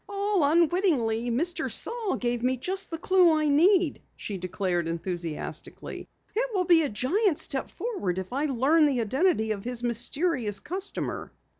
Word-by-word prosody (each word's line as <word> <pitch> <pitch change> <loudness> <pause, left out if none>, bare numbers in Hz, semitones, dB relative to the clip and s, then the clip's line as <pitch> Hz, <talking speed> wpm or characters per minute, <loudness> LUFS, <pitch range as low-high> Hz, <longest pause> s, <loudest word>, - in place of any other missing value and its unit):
"All 400 -3 +1
unwittingly, 295 - +2
Mr. 335 +10 -1
Saal 455 -4 -1
gave 240 -1 -2
me 255 +1 +1
just 380 +9 -3
the 330 - -4
clue 360 0 +4
I 305 -1 +1
need," 340 +2 +3
she 200 -3 -5
declared 180 -2 -2
enthusiastically. 170 -1 -5 0.3
"It - - 0
will 365 -1 +1
be 340 -2 +6
a 295 - 0
gigantic 315 - +1
step 270 -2 -1
forward 345 - -3
if 190 +5 -5
I 280 +3 0
learn 295 +4 +3
the 270 -4 0
identity 260 - +1
of 200 -2 -3
his 245 0 -2
mysterious 240 - 0
customer." 375 +6 -4
285 Hz, 155 wpm, -27 LUFS, 225-360 Hz, 0.3 s, be